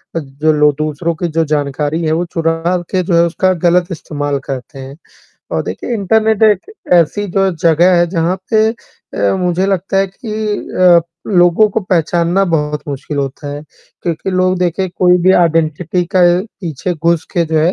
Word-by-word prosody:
अ, -, -, +1 dB
जो 150 Hz, +2 st, -1 dB
लो 150 Hz, 0 st, +4 dB
दूसरों 155 Hz, +2 st, -2 dB
की 175 Hz, -, -2 dB
जो 165 Hz, 0 st, 0 dB
जानकारी 150 Hz, +1 st, -1 dB
है, 155 Hz, -, 0 dB
वो 165 Hz, +3 st, 0 dB
चुरा 165 Hz, -1 st, -1 dB, 0.3 s
के 185 Hz, -1 st, +1 dB
जो 175 Hz, 0 st, 0 dB
है 170 Hz, 0 st, +5 dB
उसका 185 Hz, +2 st, +1 dB
गलत 175 Hz, +1 st, +2 dB
इस्तेमाल 145 Hz, -3 st, -3 dB
करते 135 Hz, +1 st, -6 dB
हैं 135 Hz, +2 st, -9 dB, 0.6 s
और -, -, 0 dB
देखिए, -, -, -5 dB
इंटरनेट 220 Hz, +1 st, +1 dB
एक 215 Hz, -, +2 dB, 0.2 s
ऐसी 175 Hz, +5 st, +2 dB
जो 195 Hz, 0 st, +2 dB
जगह 170 Hz, +3 st, +4 dB
है 175 Hz, -, +3 dB
जहाँ 170 Hz, 0 st, 0 dB, 0.2 s
पे 220 Hz, 0 st, +4 dB
अ, 230 Hz, -3 st, -4 dB
मुझे 180 Hz, 0 st, 0 dB
लगता 195 Hz, 0 st, -1 dB
है 195 Hz, -, +2 dB
कि 210 Hz, +4 st, -9 dB, 0.4 s
अ, 180 Hz, -2 st, +5 dB, 0.3 s
लोगों 180 Hz, +2 st, +4 dB
को 220 Hz, -, -1 dB
पहचानना 175 Hz, 0 st, +1 dB
बहुत 150 Hz, -4 st, -1 dB
मुश्किल 145 Hz, +1 st, -5 dB
होता 140 Hz, +1 st, -4 dB
है 145 Hz, +1 st, -6 dB, 0.4 s
क्योंकि 170 Hz, +2 st, -3 dB
लोग 185 Hz, 0 st, +1 dB
देखें 180 Hz, +1 st, -1 dB
कोई 180 Hz, -1 st, +4 dB
भी 185 Hz, +1 st, +5 dB
आइडेंटिटी 165 Hz, 0 st, +1 dB
का 185 Hz, -, +4 dB, 0.4 s
पीछे 175 Hz, 0 st, -3 dB
घुस 170 Hz, 0 st, 0 dB
के 170 Hz, -, +1 dB
जो 160 Hz, 0 st, 0 dB
है 165 Hz, +4 st, +2 dB
170 Hz, 180 wpm, -15 LUFS, 155-185 Hz, 0.6 s, है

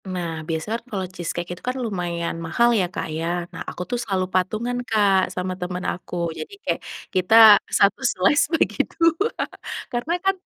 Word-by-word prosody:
Nah 170 Hz, -3 st, -3 dB
biasanya 165 Hz, +7 st, -2 dB
kan -, -, -39 dB
kalau 190 Hz, -3 st, -2 dB
cheese 175 Hz, -3 st, -5 dB
cake 175 Hz, 0 st, -4 dB
itu 175 Hz, -, -12 dB
kan 255 Hz, -, -2 dB
lumayan 175 Hz, -5 st, -3 dB
mahal 235 Hz, +9 st, +3 dB
ya, 185 Hz, -, +2 dB
Kak -, -, -3 dB
ya. 165 Hz, +1 st, -2 dB, 0.3 s
Nah -, -, -7 dB
aku -, -, -7 dB
tuh 245 Hz, -, 0 dB
selalu 190 Hz, -4 st, -1 dB
patungan 215 Hz, +7 st, 0 dB
Kak 200 Hz, -4 st, +3 dB
sama 185 Hz, 0 st, -2 dB
teman 180 Hz, 0 st, -4 dB
aku. 180 Hz, -, -9 dB, 0.2 s
Jadi -, -, -7 dB
kayak -, -, -1 dB, 0.3 s
kita 185 Hz, +3 st, +3 dB, 0.3 s
1 200 Hz, +5 st, +3 dB
slice 255 Hz, +1 st, +3 dB
bagi -, -, +1 dB, 0.2 s
2 335 Hz, +6 st, +2 dB, 0.6 s
karena 245 Hz, +8 st, -1 dB
kan 390 Hz, 0 st, +3 dB
190 Hz, 180 wpm, -23 LUFS, 180-240 Hz, 0.6 s, mahal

